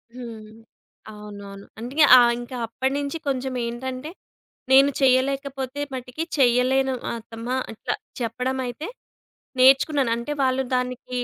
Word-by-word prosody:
హ్మ్. 225 -3 -9 0.6
అవునవును. 200 -1 -10
అందుకే 265 +7 +1
ఆహ్, 240 -1 +6
ఇంకా 245 +1 -7
అప్పటినుంచి 275 +6 -2
కొంచెం 265 -1 -1
ఏంటంటే, 255 +4 -5 0.6
నేను 275 +1 +7
చేయలేకపోతే 270 +1 +1
మటుకి 255 +5 -4
చేయలేను 260 +1 +3 0.2
అత్తమ్మా, 230 +2 -5 0.2
అట్లా 220 - -3 0.3
చెప్పడమయితే 250 +4 -3 0.7
నేర్చుకున్నాను. 270 -1 +5
అంటే 235 +5 -5
వాళ్ళు 260 0 +1
దానికి 250 0 -4
255 Hz, 100 wpm, -24 LUFS, 235-270 Hz, 0.7 s, నేను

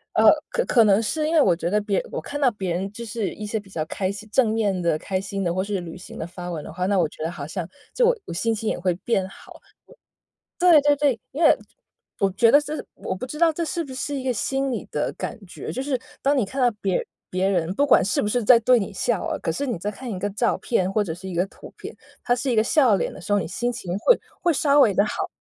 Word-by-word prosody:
呃， - - +7 0.2
可 - - 0
可 235 - +4
能 205 +2 +4
是 305 +7 -1
因 320 - -1
为 315 - +6
我 185 - +4
觉 170 0 -2
得 210 +3 +2
别 205 -2 0
我 - - -4
看 290 - -5
到 275 -3 +4
别 190 -5 -4
人 185 +3 -2
就 235 - -7
是 215 -4 -3
一 215 - -7
些 215 +1 -2
比 200 -1 -15
较 165 -5 -3
开 185 +4 -2
心， 200 +2 -7
正 240 -2 +3
面 205 -4 0
的 170 -3 +1
开 185 +4 -2
心 195 0 -4
的， 170 -2 0
或 185 - 0
是 200 -1 -2
旅 170 0 -8
行 180 - -11
的 - - -4
发 175 +1 -8
文 160 -4 -4
的 - - -9
话， 180 +3 -2
那 200 +1 +1
我 175 - +3
觉 - - -13
得 160 - -1
好 170 -5 -6
像 160 +2 -5 0.3
就 - - +3 0.2
我 - - -6
心 225 +6 0
情 220 0 -2
也 - - -2
会 180 0 +1
变 195 -5 +1
好。 190 - -14 1.0
对 350 -3 +7
对 290 +1 +4
对， 280 -4 +2
因 295 - -5
为 325 - +6 0.6
我 195 - +3
觉 230 +4 +4
得 285 - +7
是 300 +1 -5
我 - - -4
不 220 - -5
知 300 +4 -8
道 335 -1 +4
这 335 - -2
是 335 0 -2
不 265 - -9
是 275 +3 -4
一 - - -6
个 255 - +1
心 270 +6 -1
理 250 - -3
的 - - -1
感 - - -5
觉， - - -7
就 260 - -3
是 270 -1 -1 0.2
当 280 +1 +2
你 255 - +3
看 260 +8 -4
到 245 - +5
别 190 -2 +1 0.3
别 185 +1 0
人 180 -3 0
不 285 +8 +1
管 - - +6
是 190 0 0
不 - - -1
是 240 +3 0
在 235 +2 +7
对 250 +2 +4
你 200 - -2
笑 - - -1
啊， - - -2
可 - - -1
是 285 - -2
你 245 -7 -2
在 205 - -2
看 240 +4 -7
一 190 - -4
个 205 +2 -1
照 225 +4 +1
片 190 -5 0
或 215 - +1
者 180 -6 -2
是 185 +3 -8
一 - - -6
个 175 +2 +1
图 - - -14
片， - - -8 0.3
它 245 - +1
是 255 +2 -2
一 - - +1
个 215 - +5
笑 235 -3 +4
脸 - - -2
的 - - -11
时 190 - -6
候， 205 - +4
你 165 - -3
心 240 +8 -2
情 190 -7 -4
会 485 - +4 0.2
会 345 - +3
稍 290 -1 +4
微 215 -7 +5
地 200 +2 +3
好。 - - -3
210 Hz, 305 characters per minute, -23 LUFS, 185-260 Hz, 1.0 s, 呃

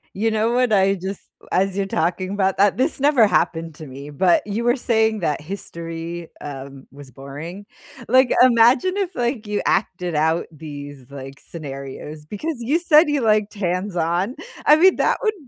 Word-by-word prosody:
You 225 +3 0
know 220 +2 +1
what? 250 -1 +2
I 195 0 +3
just 190 +1 -6 0.3
as 195 +1 +1
you're 200 - 0
talking 185 0 -1
about 195 -1 0
that 200 0 +3
this 270 +5 0
never 275 -5 +4
happened 165 -2 0
to 155 - -10
me, 140 +3 -9
but 175 +6 +2
you 210 +3 -2
were 240 0 +3
saying 220 -4 +1
that 150 -5 -1
history, 165 -1 -7
um, 135 -1 -9
was 140 -1 -13
boring, 145 - -9 0.4
like, 260 -1 +4
imagine 255 - +5
if, 380 -3 -2
like, 240 -2 -2
you 210 0 -2
acted 180 -4 -1
out 160 +2 +1
these, 145 -3 -10
like, 135 0 -9
scenarios 150 0 -8
because 300 - -4
you 280 +9 +1
said 320 -2 +5
you 295 -2 0
liked 215 -2 +2
hands-on, 180 +1 -1 0.3
I 300 - +7
mean, 370 +4 +5
that - - +1
would 435 -3 +1
190 Hz, 170 wpm, -21 LUFS, 155-235 Hz, 0.4 s, I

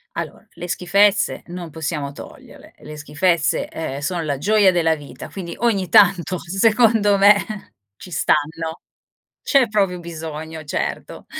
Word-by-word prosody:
Allora, - - -6
le 175 - -8
schifezze 200 +4 +2
non 175 -1 -8
possiamo 150 -3 -4
toglierle, - - -13
le 150 0 -11
schifezze, 155 +2 0
ehm, 160 -4 -5
sono 170 +4 -2
la 145 -4 -2
gioia 205 +4 +4
della 165 -3 +2
vita, 145 -2 -10
quindi 175 -3 -7
ogni 200 -5 0
tanto 180 +2 +4
secondo 210 +2 +2
me 200 +1 +7 0.6
ci 180 - -12
stanno. 160 +2 -1 0.6
C'è 270 -6 +3
proprio 195 -4 0
bisogno, 160 -1 -7
certo. 145 - -5
175 Hz, 130 wpm, -20 LUFS, 160-200 Hz, 0.6 s, me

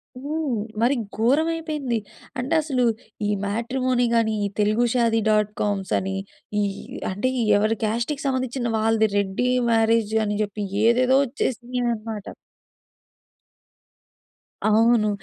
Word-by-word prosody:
హ్మ్. 285 -2 -2 0.2
మరి 245 +4 +3 0.2
ఘోరమైపోయింది. 300 +1 0 0.4
అంటే 255 +6 -2
అసలు, 270 -5 0 0.4
ఈ - - 0 0.2
మ్యాట్రిమోనీ 245 +4 0
గాని, 225 -1 +2
ఈ - - +1
తెలుగు 215 +3 +3
షాది 230 -2 +2
డాట్‌కామ్స్ 210 -2 0
అని, 195 0 -3 0.5
ఈహ్, 200 -1 -2 0.3
అంటే 205 +7 -1
ఈ - - +1
ఎవరి 215 +2 +1
కాస్ట్‌కి 235 +7 -2
సంబంధించిన 255 -3 -1
వాళ్ళది 220 0 +2
రెడ్డీ 200 +5 0 0.2
మ్యారేజ్ 225 -1 +2
అని 205 0 -1
జెప్పి, 205 0 -4 0.2
ఏదేదో 255 +3 +4
వచ్చేసినియన్నమాట. 240 -4 -3 2.4
అవును. 220 0 +4
230 Hz, 105 wpm, -23 LUFS, 215-255 Hz, 2.4 s, ఏదేదో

